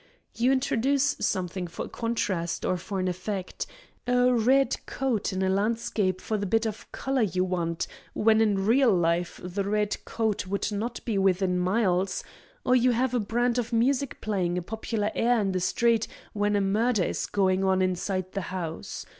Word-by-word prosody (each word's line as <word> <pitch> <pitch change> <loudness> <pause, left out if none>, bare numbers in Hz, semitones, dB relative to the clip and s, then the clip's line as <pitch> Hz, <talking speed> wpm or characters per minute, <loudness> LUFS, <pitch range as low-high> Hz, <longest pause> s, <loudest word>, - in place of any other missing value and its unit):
You 245 +3 +2
introduce 270 +2 +2
something 185 -1 -1
for 165 - -5
a - - -8
contrast 195 -7 -2
or 185 - +1
for 190 +2 -4
an 185 - 0
effect; 185 +1 -4 0.4
a 250 0 +4
red 260 +4 +3
coat 245 -6 -1
in 190 0 -1
a - - +2
landscape 200 -2 0
for 215 - -1
the 200 - -2
bit 225 +4 +2
of 215 -1 -5
color 265 -1 -1
you 185 -4 +1
want, 170 -3 -1 0.3
when 220 0 +4
in 200 -3 +2
real 245 +2 +5
life 175 -1 +1
the 180 +3 -2
red 210 +1 -1
coat 220 -4 -1
would 200 +2 -1
not 225 +4 -4
be 215 -4 0
within 185 -1 +2
miles; 185 -1 +1 0.4
or 255 - +4
you 255 0 +4
have 250 +1 0
a 245 - +2
band 240 +3 +1
of 240 0 -3
music 255 +4 +1
playing 185 -5 -1
a 180 - -2
popular 220 +1 -2
air 240 0 +2
in 200 -2 0
the 185 - 0
street 230 +4 +2 0.3
when 205 0 +1
a 200 - +2
murder 210 +2 +2
is - - -2
going 190 -1 +1
on 190 0 +3
inside 185 0 -1
the 195 - -3
house. 170 -4 -5
205 Hz, 180 wpm, -27 LUFS, 185-235 Hz, 0.4 s, real